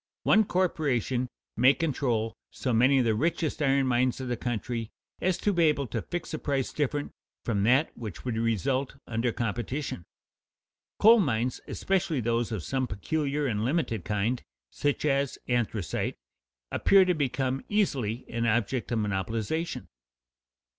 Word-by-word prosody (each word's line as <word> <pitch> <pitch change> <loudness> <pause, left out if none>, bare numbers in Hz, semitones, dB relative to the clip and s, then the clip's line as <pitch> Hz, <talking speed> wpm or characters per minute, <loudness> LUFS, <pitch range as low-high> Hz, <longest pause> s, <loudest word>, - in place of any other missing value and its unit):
One 220 0 +5
corporation 135 - 0 0.3
may 130 +4 +5
control 125 -7 0 0.2
so 125 - -2
many 125 +5 +5
of 130 - +3
the 115 - +3
richest 155 +6 0
iron 135 -1 +3
mines 125 0 +1
of 130 -1 -4
the 120 - 0
country 120 -1 -3 0.3
as 185 -1 +1
to 205 - +1
be 170 -2 +4
able 150 -3 +2
to 115 - -3
fix 175 -1 -5
a - - -2
price 135 -3 -1
different 145 0 -1 0.3
from 105 -4 0
that 130 +7 +3
which 110 -4 -7
would 125 -3 -1
result 130 +5 0
under 115 +1 0
competition. 120 - -3 1.0
Coal 225 +2 +8
mines, 125 - 0
especially 180 -6 0
those 115 0 0
of 105 -7 -3
some 130 -1 -1
peculiar 145 +7 -1
and 110 -5 0
limited 125 - 0
kind, 105 +6 -1 0.3
such 145 +1 -1
as 140 -2 +1
anthracite, 115 -7 -1 0.5
appear 195 -1 +5
to 180 - +2
become 135 -3 -1
easily 130 - 0
an 115 0 -1
object 120 +2 0
of 120 - +1
monopolization. 110 - -2
130 Hz, 145 wpm, -28 LUFS, 115-145 Hz, 1.0 s, Coal